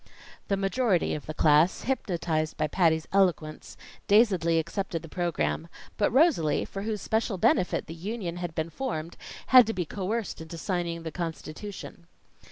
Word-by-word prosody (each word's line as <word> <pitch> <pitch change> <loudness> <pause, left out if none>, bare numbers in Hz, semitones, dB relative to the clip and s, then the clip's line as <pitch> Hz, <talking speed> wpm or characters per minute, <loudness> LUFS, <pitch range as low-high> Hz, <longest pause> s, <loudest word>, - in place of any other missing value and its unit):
The 195 - +1
majority 195 -1 +1
of 150 - -6
the 155 - -4
class, 155 +4 +4
hypnotized 170 -10 -1
by 155 - +1
Patty's 160 0 +1
eloquence, 175 -6 0 0.3
dazedly 190 -6 +4
accepted 170 +1 -2
the - - -8
program; 115 - -1 0.3
but - - +2
Rosalie, 260 - +3
for 195 - -6
whose 210 0 -3
special 220 -2 0
benefit 180 +1 +2
the 160 - -8
union 180 0 -5
had 175 -2 -5
been 160 +1 -2
formed, 170 -11 -4 0.4
had 250 -3 +9
to 225 - -1
be 180 -4 -2
coerced 200 +3 -3
into 160 +1 -8
signing 170 -1 -2
the 160 - -5
constitution. 170 +2 -7
175 Hz, 155 wpm, -27 LUFS, 160-200 Hz, 0.4 s, had